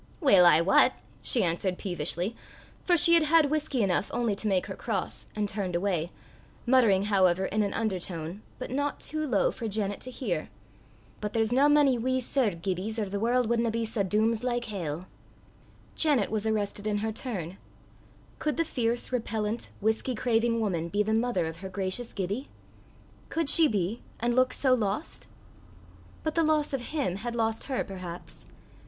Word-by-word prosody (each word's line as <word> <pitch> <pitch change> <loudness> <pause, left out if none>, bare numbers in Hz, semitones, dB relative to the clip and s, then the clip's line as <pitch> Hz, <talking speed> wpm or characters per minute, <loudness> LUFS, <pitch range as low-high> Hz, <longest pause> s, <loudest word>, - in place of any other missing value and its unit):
"Weel 195 - +6
I 160 -1 +6
wat!" 190 +4 +5 0.3
she 240 - +2
answered 180 +2 -1
peevishly, 175 +3 -2 0.5
for 350 -1 +3
she 335 +2 +7
had 335 - +6
had 310 -1 +4
whisky 295 -6 0
enough 190 0 +1
only 235 -4 0
to 215 - -4
make 190 -3 +1
her - - -6
cross, - - -4
and 210 -1 0
turned 195 -3 -3
away, 175 -3 0 0.6
muttering 235 -7 +4
however 190 -3 +3
in 215 +3 0
an 200 - 0
undertone, 185 -4 -3 0.2
but 255 - -6
not 285 +2 -1
too 310 0 -3
low 220 -7 +2
for 230 - -5
Janet 205 -1 -2
to 255 - -7
hear, 205 - -3 0.7
"but 210 -1 -4
there's 225 0 +1
nae 275 +3 +5
mony 290 -4 +4
wee 260 +2 0
Sir 255 -1 +1
Gibbies, 190 +4 -3
or 210 -3 -2
the 200 +1 -3
warl' 245 +3 +2
wadna 235 +1 +1
be 230 +1 -1
sae 220 -1 -1
dooms 215 +4 +1
like 240 -1 -1
hell." 180 -6 -4 0.9
Janet 280 -11 +2
was 220 0 -1
arrested 210 -1 -1
in 210 -1 0
her 220 - -1
turn: 195 - -5 0.8
could 300 - -1
the 330 - +1
fierce, 240 -4 -1
repellent, 225 -2 -2
whisky 220 +4 0
craving 230 0 +1
woman 170 -6 -1
be 205 +3 +1
the 220 +1 -1
mother 225 -6 +1
of 160 0 -5
her 190 +2 -7
gracious 195 +5 -4
Gibbie? 200 +8 -3 0.8
Could 330 -3 0
she 325 -2 +7
be, 205 -2 -1 0.2
and 240 +1 0
look 255 0 +3
so 265 -2 +2
lost? 225 +4 -2 1.0
But 315 - -1
the 330 - +2
loss 305 -2 +1
of 270 - -1
him 275 - -1
had 235 +3 -5
lost 225 -1 -1
her 265 -2 -1
perhaps. 180 -3 -8
220 Hz, 175 wpm, -28 LUFS, 195-250 Hz, 1.0 s, she